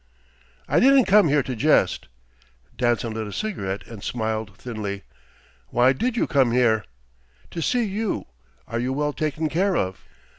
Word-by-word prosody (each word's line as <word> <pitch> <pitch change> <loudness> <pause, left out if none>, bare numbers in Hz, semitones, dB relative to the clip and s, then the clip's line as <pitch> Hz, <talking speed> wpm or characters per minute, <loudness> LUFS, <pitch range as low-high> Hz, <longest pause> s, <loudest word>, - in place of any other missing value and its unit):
"I - - +3
didn't 270 -1 +6
come 205 -2 +5
here 145 -1 +3
to 130 - -4
jest." 150 +7 +2 0.7
Danson 120 -2 0
lit 110 -1 -4
a - - -7
cigarette 100 - -4
and 110 -4 -10
smiled 110 -4 -3
thinly. 105 -5 -5 0.6
"Why 125 - +3
did 240 - -1
you - - +2
come 130 -5 +2
here?" 115 -3 +3 0.7
"To 170 - -4
see 245 +8 +1
you. 215 +1 -2 0.4
Are 115 - -3
you 125 +2 -1
well 150 +1 -1
taken 155 +1 -1
care 185 +4 +1
of?" 95 0 -2
130 Hz, 155 wpm, -24 LUFS, 110-170 Hz, 0.7 s, didn't